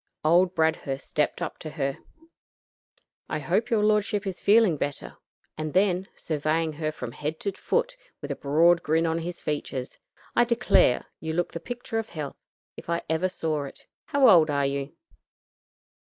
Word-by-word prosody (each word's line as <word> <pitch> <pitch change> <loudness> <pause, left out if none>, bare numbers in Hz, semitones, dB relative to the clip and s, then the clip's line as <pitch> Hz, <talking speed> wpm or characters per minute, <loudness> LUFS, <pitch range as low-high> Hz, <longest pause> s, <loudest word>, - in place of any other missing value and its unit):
Old 175 +3 +4
Bradhurst 160 -4 0
stepped 150 - 0
up - - -5
to 155 - -6
her. 140 -3 -3 1.3
"I - - -1
hope 235 +2 0
your 220 -3 +2
lordship 210 -1 +2
is 190 -2 -4
feeling 210 -4 +5
better;" 140 - -4 0.4
and 155 +1 -4
then, 190 -1 +2
surveying 155 +1 -1
her 155 0 -2
from 125 -6 -6
head 150 +5 -4
to 200 - -1
foot, - - -1 0.2
with - - -6
a - - -2
broad 165 +4 +4
grin 160 +1 +1
on 165 0 0
his 170 +1 -5
features, 135 -3 -4 0.4
"I - - +6
declare, 235 - +3
you 160 0 -4
look 175 +1 -1
the 170 - -5
picture 245 0 -4
of 225 - -5
health, 150 -4 -6 0.4
if - - -11
I 170 0 0
ever 170 +4 +1
saw 155 -5 -2
it. 135 - -12 0.2
How 280 -4 +4
old 165 -7 +7
are 140 -1 +1
you?" 140 +1 -3
165 Hz, 170 wpm, -26 LUFS, 150-195 Hz, 1.3 s, old